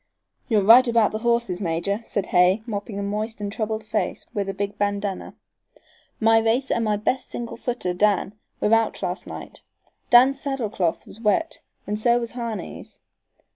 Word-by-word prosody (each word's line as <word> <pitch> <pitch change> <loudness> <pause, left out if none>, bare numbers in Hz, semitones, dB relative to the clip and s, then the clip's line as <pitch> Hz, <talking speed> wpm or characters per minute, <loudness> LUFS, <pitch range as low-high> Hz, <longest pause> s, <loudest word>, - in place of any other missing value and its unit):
"You're 215 -5 +2
right 240 +5 +8
about 230 -2 +3
the 215 - -3
horses, 235 -5 0
major," 180 +4 -1
said 200 -3 -2
Hay, 180 +4 +3
mopping 205 -2 -5
a 200 - -3
moist 215 +2 -3
and 205 -1 -4
troubled 220 0 -3
face - - -2
with 200 -3 -2
a - - -2
big 200 0 -3
bandana. 205 -1 -2 0.8
"My 225 0 +5
racer 230 +5 +1
and 230 - 0
my 210 -1 +1
best 250 +5 -1
single 235 -1 -5
footer, 240 -7 -3
Dan, 200 +1 +1 0.3
were 210 - +2
out 225 0 +1
last - - -3
night. - - -9 0.5
Dan's 260 +3 +6
saddle 270 -7 -3
cloth 175 -5 -1
was 225 - -12
wet 280 +10 +1 0.3
and 210 +1 -3
so 240 +2 +3
was 235 -1 -4
Harney's. 235 -3 -6
215 Hz, 175 wpm, -23 LUFS, 200-235 Hz, 0.8 s, right